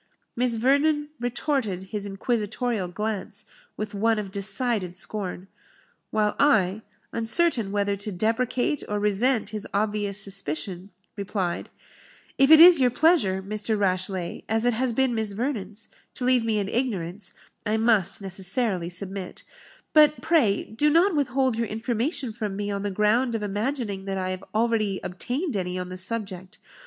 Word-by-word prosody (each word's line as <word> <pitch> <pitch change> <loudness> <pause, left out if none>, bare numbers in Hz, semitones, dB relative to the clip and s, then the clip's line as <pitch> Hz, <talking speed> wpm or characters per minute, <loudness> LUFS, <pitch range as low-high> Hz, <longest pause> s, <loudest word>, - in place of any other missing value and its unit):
Miss 245 -1 +1
Vernon 290 +5 +2
retorted 245 - -1
his 205 -2 -3
inquisitorial 215 +1 -2
glance 210 +2 -4 0.3
with 215 0 -4
one 225 +2 +1
of 205 -2 -4
decided 200 -2 0
scorn; 190 -1 -4 0.6
while 210 -1 0
I, 215 -8 +3 0.3
uncertain 230 - +2
whether 200 0 0
to 205 +2 -4
deprecate 245 +8 0
or 210 0 -1
resent 215 +4 +1
his 215 -1 -3
obvious 205 -1 0
suspicion, 190 -1 -3 0.3
replied, 195 -3 -3 0.7
"If 270 +1 +5
it 315 0 +9
is 345 -1 +10
your 255 -2 +4
pleasure, 245 - +2
Mr. 215 +2 -1
Rashleigh, 185 -2 -1
as 225 +2 +3
it 245 - +3
has 250 +2 0
been 260 +1 +1
Miss 220 -3 -1
Vernon's, 215 -3 -3 0.3
to 250 - -4
leave 250 -2 +3
me 225 -1 0
in 200 -2 -1
ignorance, 200 -6 -3 0.3
I 215 0 0
must 210 -3 +1
necessarily 190 -1 +1
submit; 190 +1 -5 0.5
but, 300 -1 +6
pray, 245 -12 +2
do 295 +8 0
not 340 +4 +3
withhold 260 -4 +1
your 230 - 0
information 235 - -2
from 210 -3 -4
me 205 0 -3
on 200 0 -3
the 205 - -2
ground 220 +5 +1
of 220 - -3
imagining 205 -1 -3
that 195 -1 -3
I 185 0 -2
have 185 0 -6
already 220 -3 +1
obtained 245 - -3
any 180 -1 -2
on 180 0 -4
the 185 - -6
subject. 190 -1 -3
215 Hz, 150 wpm, -25 LUFS, 195-245 Hz, 0.7 s, is